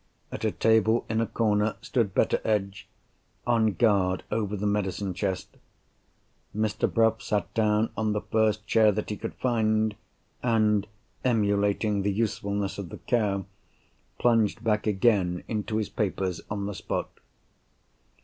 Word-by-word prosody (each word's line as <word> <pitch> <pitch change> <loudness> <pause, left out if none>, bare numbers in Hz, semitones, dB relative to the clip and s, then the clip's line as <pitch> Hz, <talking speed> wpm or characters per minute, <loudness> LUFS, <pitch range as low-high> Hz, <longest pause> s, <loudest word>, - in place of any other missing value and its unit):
At - - -6
a - - +3
table 110 +1 +2
in 110 0 +1
a 115 - 0
corner 105 -1 +1
stood 110 -6 -1
Betteredge, 100 -3 0 0.6
on 115 -3 +2
guard 95 -2 +2
over 105 -1 -1
the 100 - -3
medicine 100 -2 -1
chest. 95 +1 -3 1.0
Mr. 110 -1 0
Bruff 115 -1 +2
sat 105 -1 -2
down 110 -1 +2
on 110 -1 0
the 105 - -1
first 110 -1 +1
chair 110 +1 +4
that 105 +1 -3
he - - -2
could - - -6
find, 110 -3 +1 0.5
and 110 -4 +2 0.4
(emulating 105 -3 +1
the 100 +1 0
usefulness 100 -2 -2
of 95 -4 -6
the - - -8
cow) 100 -6 0 0.7
plunged 115 -4 +2
back 105 -1 +1
again 95 -4 +2
into 110 -1 -2
his 105 -2 -1
papers 95 -3 -2
on 100 -1 -3
the 105 - -3
spot. - - -3
105 Hz, 140 wpm, -27 LUFS, 100-110 Hz, 1.0 s, chair